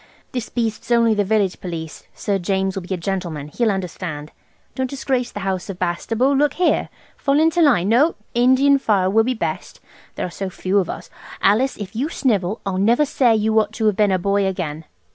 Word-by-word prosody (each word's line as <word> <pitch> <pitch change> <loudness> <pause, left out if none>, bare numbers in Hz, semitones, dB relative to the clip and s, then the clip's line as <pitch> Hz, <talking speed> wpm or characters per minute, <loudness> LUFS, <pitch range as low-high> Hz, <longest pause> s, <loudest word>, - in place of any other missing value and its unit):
This 245 -3 -4
beast's 225 -2 -3
only 235 -2 +4
the 205 -1 +1
village 200 -2 0
police. 165 -3 -7
Sir 200 -1 -1
James 190 +1 -1
will 195 - -3
be 180 - -11
a - - -6
gentleman. 170 -5 -4
He'll 230 +8 0
understand. 175 -6 -4 0.4
Don't 260 -1 -2
disgrace 260 -2 -1
the 205 - -6
house 190 0 -3
of 190 - -5
Bastable. 225 +10 0
Look 290 +1 +2
here! 360 - +1 0.3
Fall 280 +1 +2
into 325 +2 +3
line–no, 245 - +4 0.2
Indian 260 +3 +4
file 195 -7 +1
will 225 +2 +4
be 255 +1 0
best, - - -4 0.4
there - - -2
are 180 - -6
so 195 +2 -4
few 185 +2 0
of 185 - -2
us. - - -7 0.3
Alice, 230 +7 +2
if 205 0 -8
you 270 +7 -1
snivel 210 - 0
I'll 190 -1 -1
never 235 +9 +3
say 255 -5 +3
you 220 +1 +2
ought 215 0 -1
to 220 0 -2
have 210 -2 +3
been 205 -1 +3
a 185 - +3
boy 200 +2 +1
again. 165 -5 -4
210 Hz, 200 wpm, -21 LUFS, 185-245 Hz, 0.4 s, only